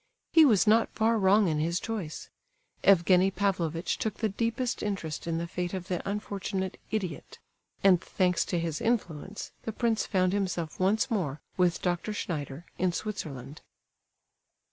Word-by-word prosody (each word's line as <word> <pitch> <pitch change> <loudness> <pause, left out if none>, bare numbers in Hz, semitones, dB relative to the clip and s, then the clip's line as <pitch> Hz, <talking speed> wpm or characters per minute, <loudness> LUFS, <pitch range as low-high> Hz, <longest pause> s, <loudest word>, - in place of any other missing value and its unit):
He 320 -1 +8
was 220 -9 +4
not 225 +1 +4
far 225 0 +2
wrong 200 +1 +4
in 155 -2 0
his 170 +3 0
choice. 205 -9 -5 0.5
Evgenie 185 0 +5
Pavlovitch 185 -4 -1
took 215 -2 -2
the 220 - 0
deepest 230 +4 -1
interest 180 -7 -3
in 165 -1 0
the 170 - -2
fate 175 +2 -3
of 185 -1 -6
the 180 -2 -1
unfortunate 200 -2 -3
"idiot," 185 -8 -4 0.5
and, 185 -3 +6
thanks 180 -3 +1
to 175 - -1
his 165 -2 -2
influence, 200 -5 -2
the 225 - -4
prince 225 0 0
found 185 -2 +2
himself 180 -5 -2
once 215 +7 +2
more 155 -10 -1 0.2
with 180 -2 +1
Dr. 180 +4 -1
Schneider, 155 -5 -4
in 185 0 +2
Switzerland. 155 - -5
185 Hz, 150 wpm, -29 LUFS, 170-210 Hz, 0.5 s, He